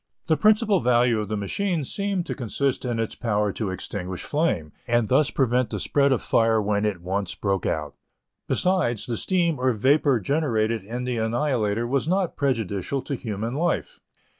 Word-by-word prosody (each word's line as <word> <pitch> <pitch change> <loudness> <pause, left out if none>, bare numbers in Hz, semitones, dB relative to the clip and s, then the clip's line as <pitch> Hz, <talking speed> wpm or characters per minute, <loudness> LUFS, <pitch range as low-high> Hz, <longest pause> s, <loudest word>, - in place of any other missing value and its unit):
The 160 - +3
principal 215 - +4
value 120 -3 +3
of 105 - -3
the 105 +1 -2
machine 165 - -1
seemed 200 +2 -2
to - - -3
consist 130 +2 -2
in 120 -2 -1
its 115 -1 -2
power 105 -3 0
to 110 -4 -3
extinguish 95 0 -5
flame, 105 - -1 0.2
and 120 -1 +2
thus 140 +3 +4
prevent 125 -3 +1
the - - -3
spread 140 -1 +2
of 130 - +1
fire 115 -1 +3
when 105 0 0
it 95 -5 -2
once 95 +1 -2
broke 95 -3 -1
out. 75 -2 -2 0.5
Besides, 180 - +1
the 120 - -2
steam 170 - 0
or 130 0 +2
vapor 135 +3 +3
generated 115 - 0
in 120 +5 -5
the 125 -1 -2
Annihilator 115 -1 0
was 135 +4 0
not 185 0 0
prejudicial 125 -2 -1
to - - -4
human 115 -2 -4
life. 170 +4 -1
120 Hz, 175 wpm, -24 LUFS, 105-145 Hz, 0.5 s, principal